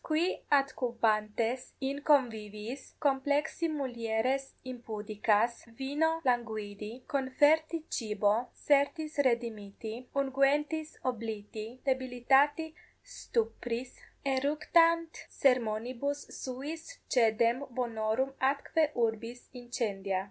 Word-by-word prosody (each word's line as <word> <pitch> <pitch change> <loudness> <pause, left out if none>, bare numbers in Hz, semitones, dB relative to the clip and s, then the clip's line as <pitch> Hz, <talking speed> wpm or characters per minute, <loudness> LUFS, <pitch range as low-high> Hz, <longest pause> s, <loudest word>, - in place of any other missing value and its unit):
qui 310 0 +2 0.4
adcubantes 230 -2 0 0.3
in 280 - -3
conviviis, 225 -2 +1 0.2
complexi 285 +4 +1
mulieres 245 0 0 0.3
impudicas, 215 -1 0 0.3
vino 290 +4 +2 0.2
languidi, 220 -4 -1 0.3
conferti 295 +5 +3 0.2
cibo, 210 -3 +2 0.3
sertis 300 +2 +2
redimiti, 220 -3 -3 0.3
unguentis 290 +3 +1 0.2
obliti, 220 -2 -6 0.2
debilitati 265 +4 +3 0.5
stupris 235 +2 -2 0.4
eructant 325 +4 +3 0.2
sermonibus 250 +2 +1 0.2
suis 280 +5 -5 0.3
caedem 230 0 +4 0.2
bonorum 230 +2 0 0.2
atque 305 +3 0 0.2
urbis 230 +2 -5 0.2
incendia. 200 -6 -1
245 Hz, 75 wpm, -31 LUFS, 220-280 Hz, 0.5 s, caedem